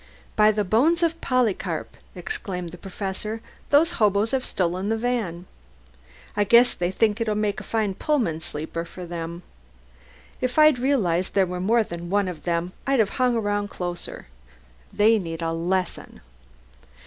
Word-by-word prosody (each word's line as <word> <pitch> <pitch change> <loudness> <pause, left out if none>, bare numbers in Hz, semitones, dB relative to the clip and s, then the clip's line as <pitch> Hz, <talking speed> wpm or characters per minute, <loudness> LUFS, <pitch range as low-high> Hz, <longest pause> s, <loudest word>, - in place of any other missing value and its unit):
"By 215 0 +6
the 210 0 0
bones 295 - +3
of 330 0 0
Polycarp!" 250 -6 0 0.2
exclaimed 195 - -4
the 180 - -10
Professor, 195 +3 -4 0.3
"those 310 +4 +5
hoboes 210 +1 +3
have 265 -1 -1
stolen 185 +2 -1
the 225 - +1
van. 220 -8 -2 0.9
I 205 - +3
guess 235 +4 +6
they 175 0 -1
think 215 +3 +1
it'll 215 -2 0
make 210 -1 0
a - - -8
fine 215 -1 -1
Pullman 225 - 0
sleeper 160 +2 -4
for 180 +1 -9
them. 170 0 -6 1.0
If 255 +2 -1
I'd 305 -4 +6
realized 195 -10 +1
there 195 -1 +4
was 180 0 -4
more 225 +4 +3
than 170 -3 -7
one 200 0 +2
of 175 -4 -7
them 175 +1 -1
I'd 275 0 +3
have 220 -4 +3
hung 250 -1 +3
around 205 -2 0
closer. 175 -2 -5 0.7
They 220 +2 +4
need 165 -2 -5
a 165 - 0
lesson." 180 +2 -2
205 Hz, 160 wpm, -24 LUFS, 180-235 Hz, 1.0 s, By